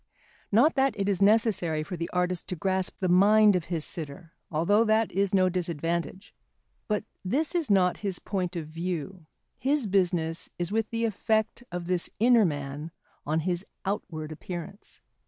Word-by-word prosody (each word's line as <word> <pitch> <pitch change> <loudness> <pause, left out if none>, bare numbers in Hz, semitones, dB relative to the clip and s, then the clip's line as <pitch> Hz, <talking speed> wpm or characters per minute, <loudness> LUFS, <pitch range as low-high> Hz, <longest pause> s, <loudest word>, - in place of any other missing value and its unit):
Not 245 +10 +5
that 270 -5 +1
it 195 - 0
is 200 -1 0
necessary 200 -7 +3
for 180 +3 -6
the 170 0 -4
artist 180 0 0
to 180 - -2
grasp 190 +2 -1
the 185 - +1
mind 205 +3 +6
of 175 -2 -1
his 165 -3 -2
sitter, 165 +1 -6 0.2
although 170 +8 +3
that 220 0 +2
is 195 +1 +1
no 190 -2 +4
disadvantage. 170 +1 -2 0.5
But 210 -1 0 0.2
this 275 +12 0
is 335 -7 -1
not 185 -3 +3
his 195 -3 -2
point 185 -2 -3
of 165 -2 -3
view, 170 +1 -5 0.3
his 280 -1 +1
business 175 -4 0
is 175 +1 -3
with 220 0 0
the 230 0 -1
effect 220 +2 0
of 175 -1 -4
this 180 -1 0
inner 235 -1 +5
man 145 0 -4 0.4
on 155 +2 +1
his 175 +2 -1 0.2
outward 160 -6 -4
appearance. 175 +4 -8
185 Hz, 165 wpm, -27 LUFS, 170-210 Hz, 0.5 s, mind